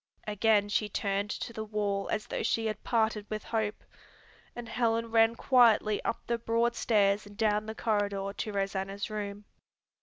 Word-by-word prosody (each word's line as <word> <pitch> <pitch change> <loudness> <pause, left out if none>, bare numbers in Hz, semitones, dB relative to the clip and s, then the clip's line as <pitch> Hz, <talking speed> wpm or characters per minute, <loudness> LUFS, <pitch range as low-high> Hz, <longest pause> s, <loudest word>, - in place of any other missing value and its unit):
Again 210 0 +2
she 210 0 0
turned 200 0 -1
to 235 - -5
the 220 - -4
wall 205 -2 -2
as 215 - -1
though - - -3
she 225 - 0
had 215 -1 -3
parted 220 -3 0
with 215 -1 -4
hope, 220 -2 -2 0.7
and 240 -1 -7
Helen 230 -1 0
ran 225 0 +4
quietly 230 -5 +4
up - - -3
the 235 0 -1
broad 230 +1 +1
stairs 205 -2 +2
and 205 0 -14
down 215 -1 +1
the 220 - -5
corridor 205 -3 -1
to 215 - -4
Rosanna's 195 +1 -3
room. 205 -1 -5
215 Hz, 170 wpm, -30 LUFS, 205-225 Hz, 0.7 s, ran